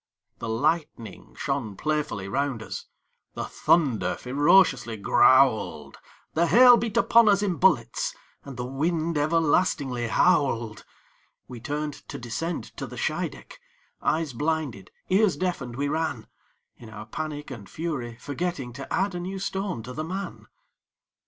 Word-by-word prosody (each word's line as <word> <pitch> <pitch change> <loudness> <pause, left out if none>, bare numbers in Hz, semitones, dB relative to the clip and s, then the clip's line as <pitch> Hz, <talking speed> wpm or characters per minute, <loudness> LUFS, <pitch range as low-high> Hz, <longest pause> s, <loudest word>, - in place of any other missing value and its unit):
The 115 - -5
lightning 145 -1 -2
shone 135 -8 -3
playfully 150 -10 -2
round 130 +1 -1
us; - - -7 0.5
The - - -3
thunder 140 -10 +1
ferociously 135 -3 +3
growled; 130 +3 +3 0.3
The 170 +2 +2
hail 245 +5 +8
beat 230 -3 -2
upon 230 -2 +5
us 200 0 +3
in 185 -5 0
bullets; 120 -12 +2 0.3
And 140 -3 -9
the 125 - -3
wind 160 +5 -1
everlastingly 145 -5 +1
howled. 120 -7 +1 0.6
We 125 -2 -9
turned 150 +4 -3 0.2
to - - -5
descend 150 +9 -4
to - - -5
the - - -10
Scheideck, - - -4 0.4
Eyes 155 -3 0
blinded, 145 - -2 0.2
ears 195 0 +3
deafened, 160 -10 -3
we 140 +2 -1
ran, 155 -6 -2 0.5
In 115 - -12
our 105 0 -9
panic 150 +4 -6
and 110 -6 -9
hurry, 145 -8 -4
forgetting 145 -4 -4
To 135 +2 -9
add 195 0 0
a 175 - -4
new 185 +2 -5
stone 190 - -3
to 125 +2 -8
the 155 - -4
man. 190 +5 -6
145 Hz, 140 wpm, -26 LUFS, 120-170 Hz, 0.6 s, hail